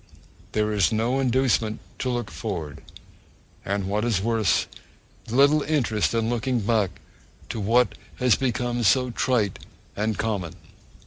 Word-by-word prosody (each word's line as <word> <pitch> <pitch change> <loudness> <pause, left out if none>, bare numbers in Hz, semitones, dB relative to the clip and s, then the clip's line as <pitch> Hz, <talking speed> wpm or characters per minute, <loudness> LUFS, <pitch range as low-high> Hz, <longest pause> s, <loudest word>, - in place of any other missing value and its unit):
There 105 0 +1
is 105 0 +2
no 115 +4 +1
inducement 125 -4 +1 0.2
to 130 - -1
look 120 -6 -2
forward; 80 -4 -5 0.8
and 100 0 -2
what 105 +3 -1
is 115 -5 +1
worse, 110 -1 +1 0.6
little 140 +5 +4
interest 120 -8 0
in 115 -1 +1
looking 120 +1 0
back 105 -4 0 0.5
to 115 - -4
what 115 +4 +3 0.2
has 125 -2 +3
become 120 -2 -1
so 125 +4 +3
trite 115 -5 0 0.4
and 105 0 -1
common. 100 -7 -2
115 Hz, 130 wpm, -25 LUFS, 105-125 Hz, 0.8 s, little